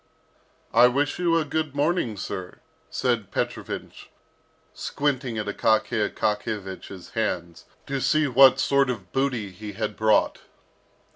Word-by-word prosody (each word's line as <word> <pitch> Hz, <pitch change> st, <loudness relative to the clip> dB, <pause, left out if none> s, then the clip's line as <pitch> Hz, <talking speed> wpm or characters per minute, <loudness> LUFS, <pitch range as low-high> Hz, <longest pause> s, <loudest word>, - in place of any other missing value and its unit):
"I 125 Hz, -, +7 dB
wish 140 Hz, +5 st, 0 dB
you 170 Hz, -2 st, +3 dB
a 160 Hz, -, +1 dB
good 155 Hz, -1 st, -2 dB
morning, 145 Hz, -, 0 dB
sir," 90 Hz, -1 st, -6 dB, 0.3 s
said 115 Hz, -6 st, -1 dB
Petrovich -, -, -4 dB, 0.6 s
squinting 130 Hz, -5 st, -2 dB
at 105 Hz, -, -2 dB
Akaky 110 Hz, +1 st, +1 dB
Akakiyevich's 100 Hz, -3 st, -4 dB
hands, 85 Hz, -7 st, -3 dB, 0.2 s
to 135 Hz, -1 st, -3 dB
see 155 Hz, +2 st, +2 dB
what 130 Hz, 0 st, +6 dB
sort 140 Hz, -1 st, +3 dB
of 100 Hz, -8 st, -5 dB
booty 125 Hz, -7 st, -1 dB
he 105 Hz, +3 st, -8 dB
had 105 Hz, 0 st, -3 dB
brought. 110 Hz, 0 st, +2 dB
120 Hz, 125 wpm, -25 LUFS, 105-140 Hz, 0.6 s, I